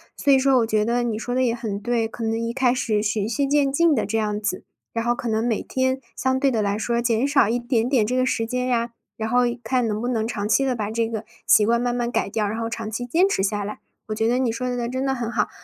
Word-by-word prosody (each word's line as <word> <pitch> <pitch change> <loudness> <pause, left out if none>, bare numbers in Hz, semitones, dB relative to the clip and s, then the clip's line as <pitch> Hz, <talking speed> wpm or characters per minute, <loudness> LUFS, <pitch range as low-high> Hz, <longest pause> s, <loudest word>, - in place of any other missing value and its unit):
所 285 - +2
以 270 - +7
说 265 0 +3
我 230 -2 +2
觉 215 -1 +1
得 240 +1 +1
你 235 -3 -1
说 245 +2 -4
得 255 - +1
也 240 -2 +2
很 215 -4 -4
对， 230 0 0
可 230 +1 -7
能 225 0 0
一 230 0 -2
开 255 -1 +2
始 220 -4 0
循 210 -1 -1
序 255 +5 0
渐 280 -1 +2
进 325 +2 +3
的 220 - 0
这 225 +2 -1
样 210 -1 -1
子。 195 -3 -2 0.3
然 230 0 -2
后 240 - +3
可 240 -1 -4
能 220 +2 0
每 225 -3 0
天 260 0 -1 0.2
相 260 0 0
对 275 0 +3
地 230 - 0
来 200 -1 0
说 235 +2 -1
减 235 +2 +1
少 280 -5 +4
一 235 +3 0
点 240 -1 0
点 255 -5 +3
这 235 +4 -1
个 255 0 +2
时 225 -3 -1
间 250 +1 -1
呀， 235 -2 0 0.2
然 220 0 -3
后 245 +1 +3 0.2
看 245 +1 +1
能 215 0 -2
不 240 - -2
能 225 -3 0
长 210 -2 -3
期 270 +5 +3
的 260 -2 0
把 210 -3 -3
这 225 +1 0
个 225 -1 -4 0.2
习 210 - +5
惯 235 +1 +3
慢 245 0 -1
慢 240 0 -1
改 - - 0
掉， 215 -1 0
然 220 +3 -3
后 225 - -2
长 225 -1 -5
期 225 +3 -4
坚 345 +10 +3
持 195 - 0
下 205 +1 0
来。 210 +1 -5 0.3
我 215 - -3
觉 225 +1 +1
得 245 +2 +2
你 250 -3 +1
说 250 +2 -3
得 240 -1 -2
真 260 +2 -2
得 270 - +1
很 240 -3 -3
好。 235 - 0
235 Hz, 315 characters per minute, -23 LUFS, 220-255 Hz, 0.3 s, 以